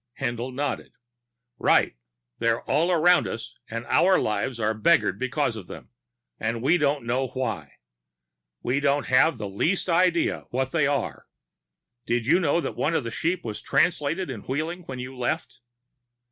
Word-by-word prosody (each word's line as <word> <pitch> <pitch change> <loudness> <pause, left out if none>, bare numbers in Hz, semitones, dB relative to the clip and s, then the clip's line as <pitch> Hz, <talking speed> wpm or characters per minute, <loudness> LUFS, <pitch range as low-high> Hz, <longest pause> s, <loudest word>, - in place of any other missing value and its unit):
Haendl 120 -1 -2
nodded. 140 +2 -3 0.7
"Right. - - +3 0.4
They're 115 0 +1
all 170 +4 +1
around 175 +1 +4
us 115 0 -7
and 115 +1 -5
our 185 +8 +4
lives 110 +4 -1
are 110 0 +1
beggared 165 +11 +2
because 130 -1 0
of 100 -5 -8
them. - - -11 0.5
And 115 +1 -2
we 165 +6 +4
don't 145 0 +1
even - - -13
know 130 +3 0
why. 130 0 -4 0.9
We 130 +3 +1
don't 145 0 +1
have 130 +5 +4
the 105 - -4
least 165 - 0
idea 170 0 +3
of - - -17
what 130 +1 -1
they 155 -4 +2
are. 140 -4 -2 0.8
Did 120 -1 0
you 160 +8 +4
know 170 -2 +2
that - - -4
one 165 - 0
of - - +1
the 115 - -5
sheep 170 +7 -1
was 105 -2 -5
Translated 170 -1 +1
in 110 -6 -6
Wheeling 160 - -3
when 130 - -5
you 125 +1 -7
left?" 125 -1 -3
135 Hz, 170 wpm, -25 LUFS, 120-165 Hz, 0.9 s, around